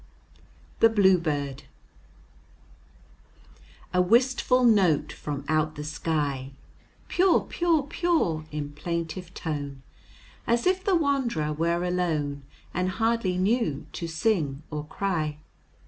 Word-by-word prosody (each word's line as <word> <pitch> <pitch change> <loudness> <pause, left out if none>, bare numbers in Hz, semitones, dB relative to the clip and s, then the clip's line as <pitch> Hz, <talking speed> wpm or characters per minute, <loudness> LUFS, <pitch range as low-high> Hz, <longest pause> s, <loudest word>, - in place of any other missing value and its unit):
THE 225 - +7
BLUEBIRD 165 -10 +2 2.3
A 180 - +4
wistful 250 +5 +3
note 195 -10 +4
from 145 -1 -5
out 155 0 +1
the 150 - -5
sky, 145 -3 -2 0.5
"Pure, 365 0 +3
pure, 335 -4 +1
pure," 285 - 0
in 145 -1 -4
plaintive 170 +3 -4
tone, 145 -4 -4 0.6
As 235 0 +2
if 370 0 +2
the 395 -2 +2
wand'rer 265 - 0
were 170 +3 0
alone, 160 -6 -1 0.3
And 180 +1 0
hardly 225 -2 0
knew 190 - 0
to 170 - -4
sing 160 -5 0
or 150 -1 -4
cry. 155 -4 -2
170 Hz, 105 wpm, -26 LUFS, 150-230 Hz, 2.3 s, THE